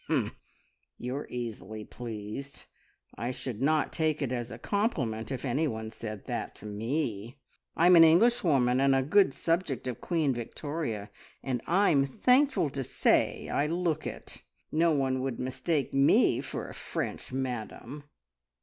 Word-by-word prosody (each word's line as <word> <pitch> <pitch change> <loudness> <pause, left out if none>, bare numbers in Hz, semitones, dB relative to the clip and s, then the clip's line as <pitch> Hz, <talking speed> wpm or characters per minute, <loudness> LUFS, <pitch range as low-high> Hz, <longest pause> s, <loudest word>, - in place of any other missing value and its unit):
"Humph! - - 0 0.6
You're 130 +4 -4
easily 110 -3 -6
pleased. 115 +3 -7 0.5
I 120 - -4
should 125 -2 -5
not 155 +2 +2
take 155 -2 0
it 130 - -2
as 120 -2 -3
a - - -7
compliment 135 - -1
if 130 +1 -4
anyone 120 -5 -1
said 110 -3 -7
that - - -4
to - - -12
me. 115 +1 -3 0.4
I'm 175 +2 +7
an 165 - +9
Englishwoman, 160 - +4
and 135 0 +4
a 135 - +2
good 190 +3 +4
subject 165 -5 -1
of 125 -2 -4
Queen 160 -6 +1
Victoria, 120 -2 -4 0.3
and 130 -3 -2
I'm 170 -6 +4
thankful 250 - +3
to 135 -1 -3
say - - +1
I 145 - 0
look 165 -1 -1
it. - - -8 0.3
No 165 +2 +3
one 135 -3 +1
would 130 -2 -3
mistake 135 +4 -1
me 135 +1 +4
for - - -5
a - - -9
French - - -5
madam!" 130 +2 -5
135 Hz, 145 wpm, -29 LUFS, 120-160 Hz, 0.6 s, an